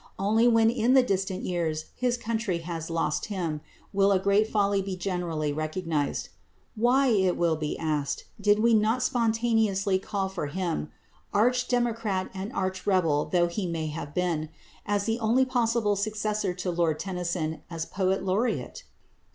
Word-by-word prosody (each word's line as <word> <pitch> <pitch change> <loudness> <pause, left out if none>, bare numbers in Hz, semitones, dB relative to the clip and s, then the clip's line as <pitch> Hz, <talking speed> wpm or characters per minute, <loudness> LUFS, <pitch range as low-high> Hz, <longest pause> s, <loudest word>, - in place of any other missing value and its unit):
Only 220 +4 +3
when 225 -1 +5
in 240 +2 +2
the 260 - +7
distant 190 -4 -1
years 160 -3 -2
his 245 -1 0
country 220 -5 -1
has 165 -2 -4
lost 165 0 -1
him, 170 -7 -3 0.3
will 200 0 +4
a 195 - +5
great 200 +3 +2
folly 200 -2 +1
be 190 -1 -4
generally 175 -5 -2
recognised. 155 -1 -2 0.5
Why, 250 +4 +3
it 190 -5 +2
will 170 -2 +2
be 155 -1 -3
asked, 150 -3 -2 0.2
did 205 0 +4
we 230 +2 +3
not 220 +3 +3
spontaneously 225 -5 +1
call 195 0 -2
for 185 -6 -4
him 170 -1 -2 0.5
arch 245 +4 +3
democrat 230 -6 0
and 195 +3 -5
arch 190 +1 -3
rebel 165 -7 +2
though 175 -1 +2
he 180 +2 -3
may 160 -2 -2
have 145 -1 -6
been 165 -4 0 0.4
as 205 0 +1
the 225 +1 0
only 235 +4 +3
possible 230 -4 +1
successor 210 -2 -1
to 180 0 -2
Lord 170 -3 +1
Tennyson 175 -4 -3
as 165 -2 -4
Poet 190 +3 -1
Laureate? 225 - -1
195 Hz, 160 wpm, -27 LUFS, 170-220 Hz, 0.5 s, the